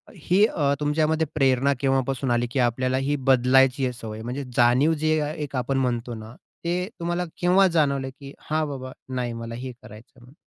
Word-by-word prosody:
ही 185 +5 +3
अ, 145 -8 0
तुमच्यामध्ये 155 +2 +1
प्रेरणा 135 -1 +3
केव्हापासून 135 -1 0
आली 120 0 +1
की 135 - -1
आपल्याला 130 +2 +1
ही 145 - +1 0.2
बदलायची 130 +1 +4
सवय? 110 -2 -7
म्हणजे 125 +5 -4
जाणीव 125 +6 +4
जी 155 - +1 0.3
एक 145 -2 -5
आपण 130 +2 -1
म्हणतो 120 -2 -1
ना, 110 +2 -10 0.3
ती 180 +2 -1
तुम्हाला 175 +1 -1 0.2
केव्हा 185 +2 +5
जाणवली 140 -5 +1
की 140 0 -10 0.2
हां, 155 0 0
बाबा 130 -2 -6 0.2
नाही, 120 -2 -2
मला 115 0 -6
हे 130 +2 -6
करायचं 115 -1 -14
आहे 125 - -19
म्हणून. 125 +3 -17
135 Hz, 180 wpm, -24 LUFS, 125-150 Hz, 0.3 s, केव्हा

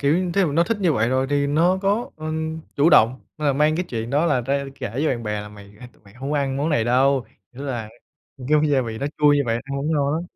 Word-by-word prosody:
kiểu, 170 +6 +1
thí 200 - +3
dụ 165 -6 +1
nó 170 +3 +3
thích 230 - -1
như 180 -5 +3
vậy 115 -4 +1
rồi 130 +1 +1
thì 145 0 +1
nó 170 +6 +2
có, 205 +4 0
ừm, 160 0 -4 0.2
chủ 150 +4 +4
động 125 0 +5 0.2
là 150 -2 +1
mang 150 +3 +2
cái 180 - -1
chuyện 115 -1 -4
đó 150 +5 +2
là 145 -6 +2
ra 140 +3 -1
kể 100 - -5
với 145 +5 0
bạn 120 -5 -1
bè 105 -1 -3
là 105 - -8
"Mày 100 -1 -14
hai 125 - -11
tụi - - -28
mày 100 -1 -19
hông 135 +3 -6
có - - +1
ăn 135 -1 -1
món 145 +3 0
này 145 -8 +1
đâu." 130 +2 +2 0.3
Nghĩa 130 +3 -9
là 120 -6 -4 0.6
cái 150 0 +3
gia 140 -2 +3
vị 115 -3 -5
nó 140 - -2
chua 150 -1 +5
nhưng 145 -2 +1
bạn 115 +1 0
ăn 140 0 -5
vẫn 150 +3 -2
ngon 145 -2 +1
lắm. 165 - -2
140 Hz, 285 wpm, -22 LUFS, 125-155 Hz, 0.6 s, động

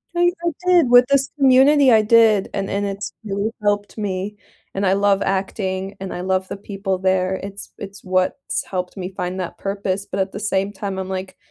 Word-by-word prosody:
I 350 0 +4
I 340 - +2
did 350 -8 +4
with 245 0 +7
this 275 -1 +2
community, 270 0 +6
I 220 -1 +6
did, 220 -2 +4
and 195 -1 -2
and 200 +1 -1
it's 200 +1 -5
really 205 +1 -2
helped 205 0 -1
me 205 0 -3 0.4
and 195 +1 0
I 190 - +3
love 200 0 +2
acting 195 0 -2
and 190 -1 -5
I 180 - -5
love 185 0 0
the - - -6
people 195 -1 -3
there, 185 0 +1
it's 200 0 -8
it's 200 0 -9
what's 185 -1 -1
helped 180 0 -4
me 185 0 -5
find 180 0 -3
that 180 - -5
purpose, 195 0 -3
but 195 - -3
at 190 0 0
the - - -6
same 200 -1 0
time, 195 -1 -5
I'm 190 0 -5
like, 190 0 -5
195 Hz, 205 wpm, -21 LUFS, 190-210 Hz, 0.4 s, with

